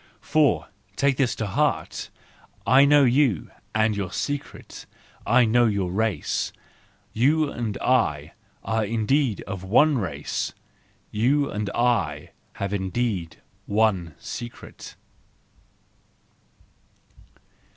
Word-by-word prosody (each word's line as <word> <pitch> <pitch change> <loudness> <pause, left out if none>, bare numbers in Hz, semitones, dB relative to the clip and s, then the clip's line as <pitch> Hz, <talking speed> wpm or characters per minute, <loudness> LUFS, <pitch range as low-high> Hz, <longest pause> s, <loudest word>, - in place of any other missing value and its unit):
For - - +2 0.3
—take 140 -2 +2
this 130 -3 +1
to 110 - -3
heart!—I 130 +6 0
know 145 0 +6
you 125 - +2 0.2
and 110 -1 +2
your 95 -3 -3
secret, 145 +9 -5 0.4
I 125 - +5
know 120 +2 +4
your 100 -4 -1
race! 110 +2 -1 0.6
You 145 +5 +2
and 110 -4 -3
I 75 - +1 0.3
are 110 0 0
indeed 115 +3 0
of 95 -1 -7
one 135 +8 +4
race! 75 -8 -3 0.6
You 140 +7 +1
and 105 -1 -3
I 115 -12 0 0.2
have 100 0 -4
indeed 95 -3 -2 0.2
one 100 -7 +1
secret! 120 0 -9
110 Hz, 100 wpm, -24 LUFS, 95-130 Hz, 0.6 s, know